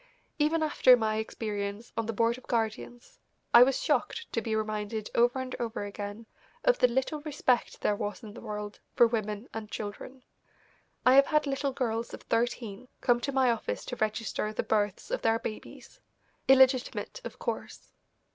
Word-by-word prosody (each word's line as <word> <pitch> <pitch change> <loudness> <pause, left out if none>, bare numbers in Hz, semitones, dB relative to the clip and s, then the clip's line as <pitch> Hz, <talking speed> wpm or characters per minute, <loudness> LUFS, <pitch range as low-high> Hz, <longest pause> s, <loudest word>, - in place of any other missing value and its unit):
Even 315 +2 +2
after 260 -4 +6
my 215 -2 0
experience 210 0 -4
on 230 -1 -2
the - - 0
Board 230 +2 +1
of 255 - -14
Guardians, 235 +1 -3 0.3
I 235 - +10
was 260 +1 +5
shocked 465 - 0
to 230 - 0
be 220 0 -2
reminded 215 0 -3
over 240 +2 +3
and 260 0 -4
over 230 -3 -3
again 205 +2 -6 0.4
of - - +3
the - - +6
little 265 +5 -1
respect 285 -5 0
there 205 - +2
was 205 +3 -4
in 210 -2 -9
the - - -10
world 210 -2 -6 0.2
for 240 - +7
women 215 -1 -2
and 220 -1 -6
children. 220 +6 -7 0.8
I 255 - +7
have 275 +1 +7
had 300 -1 +2
little 275 0 -1
girls 235 -3 -2
of - - -15
thirteen 230 -1 -2
come 240 -1 +3
to 280 - -2
my 260 -2 +3
office 230 - -3
to - - -5
register 215 -1 -2
the 215 - -2
births 210 - -1
of - - -1
their 225 0 +3
babies, 215 -1 -8 0.5
illegitimate, 265 - +3
of - - -7
course. - - -5
230 Hz, 175 wpm, -29 LUFS, 215-260 Hz, 0.8 s, I